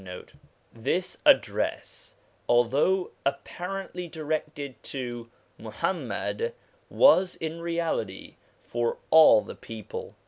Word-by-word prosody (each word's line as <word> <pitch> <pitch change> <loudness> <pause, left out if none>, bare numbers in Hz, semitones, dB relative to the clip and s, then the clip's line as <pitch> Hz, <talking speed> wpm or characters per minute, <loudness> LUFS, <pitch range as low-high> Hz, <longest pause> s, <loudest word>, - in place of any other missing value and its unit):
1 90 -1 -9 0.5
This - - -2
address, - - +1 0.3
although 135 +10 +3
apparently 180 +5 -4
directed 150 -3 -4
to 120 -3 -6 0.3
Muhammad, 475 +1 -3 0.3
was 190 - +5
in 160 +1 -5
reality 165 - -3 0.3
for 120 -1 -2
all 160 -9 +8
the - - -8
people. 110 -3 -8
155 Hz, 90 wpm, -27 LUFS, 120-175 Hz, 0.5 s, all